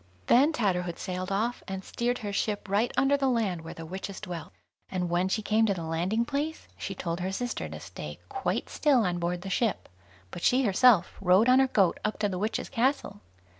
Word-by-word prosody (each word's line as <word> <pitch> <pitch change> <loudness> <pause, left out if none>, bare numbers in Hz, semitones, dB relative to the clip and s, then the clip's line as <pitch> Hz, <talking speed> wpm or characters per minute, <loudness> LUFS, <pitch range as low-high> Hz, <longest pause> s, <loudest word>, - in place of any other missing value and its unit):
Then 280 +6 +5
Tatterhood 180 - -1
sailed 185 +1 -4
off, 225 +5 -1
and 190 -1 -5
steered 245 +1 -1
her 205 - -3
ship 205 0 -1
right 205 +5 +1
under 275 +1 +4
the 275 -1 +1
land 210 -9 0
where 160 - -9
the 165 - -8
witches 190 +3 -6
dwelt, 175 - -7 0.4
and 180 -2 -2
when 180 +2 +1
she 215 +3 -1
came 220 +1 +3
to 200 - +1
the 170 - -5
landing 175 +8 0
place, 295 +4 -3
she 195 - -5
told 170 -1 -3
her 185 +1 -2
sister 245 +5 -3
to - - -7
stay - - -8
quite 395 -2 -2
still 270 -7 +2
on 175 -1 -1
board 175 +1 -2
the 195 - -5
ship; 225 +2 0 0.4
but - - -7
she 255 +7 +3
herself 210 -3 +4
rode 190 +4 +5
on 255 +1 +6
her 265 - +4
goat 195 -8 +2
up 215 - -1
to 210 - +1
the 185 -2 -3
witches' 215 +3 -2
castle. 235 -4 0
200 Hz, 210 wpm, -28 LUFS, 180-245 Hz, 0.4 s, on